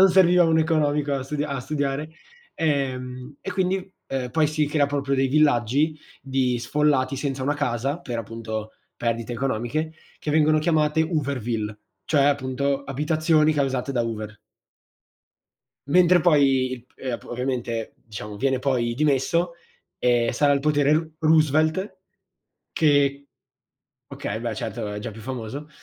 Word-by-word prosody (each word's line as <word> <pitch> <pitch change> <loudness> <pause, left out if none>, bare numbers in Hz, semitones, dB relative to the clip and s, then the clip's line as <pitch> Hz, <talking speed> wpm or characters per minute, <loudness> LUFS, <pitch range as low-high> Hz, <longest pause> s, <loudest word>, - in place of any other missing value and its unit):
non 190 - +8
serviva 180 -1 +5
un 160 -1 +3
economico 150 -3 +1
a 135 - -2
stu 135 +3 -5
a 140 -3 -3
studiare. 145 +2 -2 0.4
Ehm, 130 -3 -2
e - - -5
quindi 190 0 -1 0.4
poi 155 +2 +3
si 150 0 0
crea 145 -1 +2
proprio 140 -1 -1
dei 135 0 +2
villaggi, 145 +1 +2 0.2
di 130 -2 0
sfollati 140 0 +1
senza 135 -1 -3
una 145 +2 +1
casa, 140 +2 -1
per 120 -8 -4
appunto 110 -1 -5 0.2
perdite 115 0 -2
economiche, 135 +5 -2 0.3
che 150 - -3
vengono 155 0 +4
chiamate 155 -1 +2
Hooverville, 125 -9 -2 0.3
cioè 145 -3 +3
appunto 140 0 0
abitazioni 155 +3 +2
causate 135 -2 -1
da 120 - +1
Hoover. 110 -2 -5 1.5
Mentre 180 +3 +5
poi 140 -6 +4
il 125 -2 -7
p - - -34
ehm, 130 -3 -4
ovviamente 120 -2 -3
diciamo 105 -1 -8
viene 130 +3 +1
poi 125 -3 0
dimesso, 155 +5 +1 0.5
ehm, 120 -1 +2
sale 145 +3 +3
al 140 - +2
potere 145 0 +3
Ro 155 +1 +1
Roosevelt 155 +4 +2 0.7
che 140 -2 +2 0.8
okay, 110 +2 -5
beh, 115 -1 -3
certo 105 -1 -4
è - - -4
già 115 - -5
più 110 +1 -11
famoso, 130 +4 -6
140 Hz, 140 wpm, -24 LUFS, 125-155 Hz, 1.5 s, non